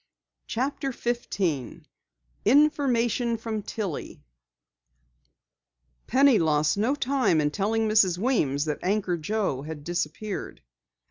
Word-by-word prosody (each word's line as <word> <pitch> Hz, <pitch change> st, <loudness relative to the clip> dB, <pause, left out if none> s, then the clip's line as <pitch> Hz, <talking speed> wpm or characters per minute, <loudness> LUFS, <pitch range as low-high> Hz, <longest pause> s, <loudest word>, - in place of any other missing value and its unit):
CHAPTER 270 Hz, +3 st, -2 dB
15 200 Hz, -, -3 dB, 0.6 s
INFORMATION 245 Hz, -3 st, +2 dB
FROM 225 Hz, -1 st, -4 dB
TILLIE 200 Hz, -6 st, -5 dB, 1.8 s
Penny 265 Hz, -1 st, +5 dB
lost 150 Hz, -2 st, +2 dB
no 225 Hz, +8 st, +1 dB
time 270 Hz, -, +1 dB
in 150 Hz, -1 st, +1 dB
telling 220 Hz, +5 st, 0 dB
Mrs. 205 Hz, -5 st, +3 dB
Weems 160 Hz, -, +1 dB
that 150 Hz, -2 st, -2 dB
Anchor 190 Hz, -1 st, 0 dB
Joe 170 Hz, -4 st, -2 dB
had 150 Hz, 0 st, -7 dB
disappeared. 175 Hz, +5 st, -4 dB
215 Hz, 95 wpm, -26 LUFS, 160-240 Hz, 1.8 s, Penny